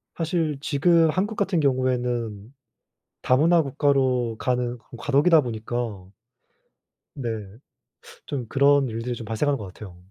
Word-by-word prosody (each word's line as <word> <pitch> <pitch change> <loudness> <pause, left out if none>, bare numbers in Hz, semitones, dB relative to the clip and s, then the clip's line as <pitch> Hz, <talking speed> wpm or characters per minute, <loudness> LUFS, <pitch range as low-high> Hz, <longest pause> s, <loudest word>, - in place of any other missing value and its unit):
사실 160 -3 -1
지금 165 +3 +3
한국 195 +7 -1
같은 195 -4 +1
경우에는 125 -5 -1 0.7
다문화 160 +6 +4
국가로 130 -4 +1
가는 125 -1 -1
그런 120 +1 -14
과도기다 145 +5 +4
보니까 115 -5 -5 1.0
네. 115 -7 -4 0.8
좀 130 -5 -4
그런 140 +1 +3
일들이 115 +2 -4
좀 115 - -8
발생하는 135 +6 0
것 105 - -7
같아요. 95 -3 -11
130 Hz, 265 characters per minute, -24 LUFS, 115-150 Hz, 1.0 s, 다문화